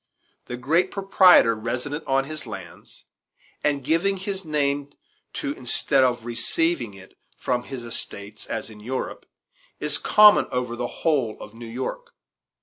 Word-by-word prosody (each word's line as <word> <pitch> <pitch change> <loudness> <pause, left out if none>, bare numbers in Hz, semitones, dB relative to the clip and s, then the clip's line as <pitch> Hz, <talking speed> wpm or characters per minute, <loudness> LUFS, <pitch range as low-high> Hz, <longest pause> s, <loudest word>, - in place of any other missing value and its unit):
The 120 - -5
great 165 +9 +1
proprietor 190 - +5
resident 125 +7 -4
on 135 0 +2
his 155 -1 -7
lands, 95 -5 -10 0.6
and 145 -2 0
giving 165 +7 +1
his 190 0 -4
name 145 -2 -1 0.4
to 140 - -3
instead 130 +1 +5
of 120 -2 0
receiving 120 - -1
it 95 0 -15 0.2
from 125 -1 -1
his 130 -3 -7
estates 105 -3 -5
as 110 0 -5
in 105 - -13
Europe, 125 +5 -5 0.5
is - - +1
common 210 0 +6
over 125 -1 -3
the 120 0 -3
whole 135 -9 -1
of 105 - -11
New 115 0 -10
York. 470 - -6
130 Hz, 145 wpm, -23 LUFS, 115-160 Hz, 0.6 s, common